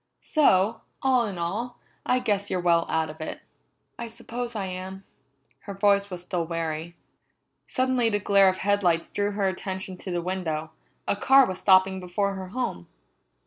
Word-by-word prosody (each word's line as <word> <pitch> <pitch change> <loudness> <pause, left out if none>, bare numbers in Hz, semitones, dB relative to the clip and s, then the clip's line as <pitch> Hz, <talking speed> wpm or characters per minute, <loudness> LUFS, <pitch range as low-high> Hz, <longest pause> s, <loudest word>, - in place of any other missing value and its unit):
So, 220 - +3 0.2
all 255 -3 +3
in 195 -3 -5
all, 215 +9 -3 0.3
I 250 - +3
guess 205 -5 0
you're 185 - 0
well 170 -1 +3
out 160 -1 0
of 155 +1 -13
it." 155 - -5 0.6
"I 235 - -4
suppose 235 +1 -6
I 200 -2 -2
am." 190 +1 -6 0.6
Her 200 - -6
voice 200 0 +3
was 180 -2 -6
still 180 -1 -2
weary. 165 0 -4 0.7
Suddenly 255 -2 +1
the 205 - +1
glare 200 -1 +5
of 185 - -2
headlights 185 -5 +2
drew 205 0 -1
her 200 -1 0
attention 190 0 -4
to 185 - -8
the 175 -1 -1
window; 160 -4 -3 0.4
a - - +2
car 270 +6 +6
was 185 -3 -4
stopping 190 0 +4
before 190 +2 -1
her 190 -1 -6
home. 195 - -4
190 Hz, 170 wpm, -26 LUFS, 180-210 Hz, 0.7 s, car